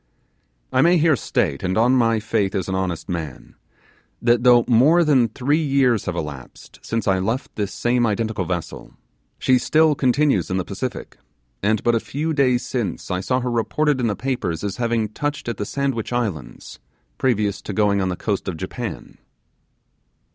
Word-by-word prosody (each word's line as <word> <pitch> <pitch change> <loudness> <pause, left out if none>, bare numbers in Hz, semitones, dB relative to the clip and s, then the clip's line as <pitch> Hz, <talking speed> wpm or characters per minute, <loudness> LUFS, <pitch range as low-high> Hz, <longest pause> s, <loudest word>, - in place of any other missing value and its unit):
I - - +4
may 175 +2 +5
here 160 -1 +4
state, 70 - -1
and 95 +1 -1
on 120 +3 +4
my 115 -3 +3
faith 105 -2 -1
as 95 - -2
an 95 - -2
honest 90 -4 -2
man, 80 -7 -6 0.7
that 120 0 +3
though 120 -1 +5
more 145 +9 +5
than 135 -7 +4
three 140 +7 0
years 135 -6 +2
have 90 - -3
elapsed 75 -6 -8
since 115 -2 -3
I 95 -1 +3
left 115 +8 -3
this 100 -2 -2
same 120 0 +1
identical 110 -2 -1
vessel, 85 -1 -5 0.4
she 130 -1 +3
still 155 +2 +3
continues; 135 - +1
in 95 - -1
the 95 - -2
Pacific, 115 +6 -6 0.4
and 105 +1 +1
but 120 - +3
a 115 - +2
few 155 +7 -3
days 130 -4 +2
since 110 -9 -3
I 90 - 0
saw 125 +7 0
her 125 0 -2
reported 130 +4 0
in 120 - +1
the 105 - -1
papers 115 -11 -3
as 100 -2 -3
having 115 -2 0
touched 145 +6 -4
at 120 -3 -3
the 105 - -3
Sandwich 135 -6 -2
Islands 100 - -4 0.4
previous 105 -6 0
to - - -6
going 100 0 +2
on 95 - 0
the 90 - -2
coast 100 +1 -3
of 90 -4 -3
Japan. 95 +2 -6
115 Hz, 180 wpm, -21 LUFS, 95-130 Hz, 0.7 s, may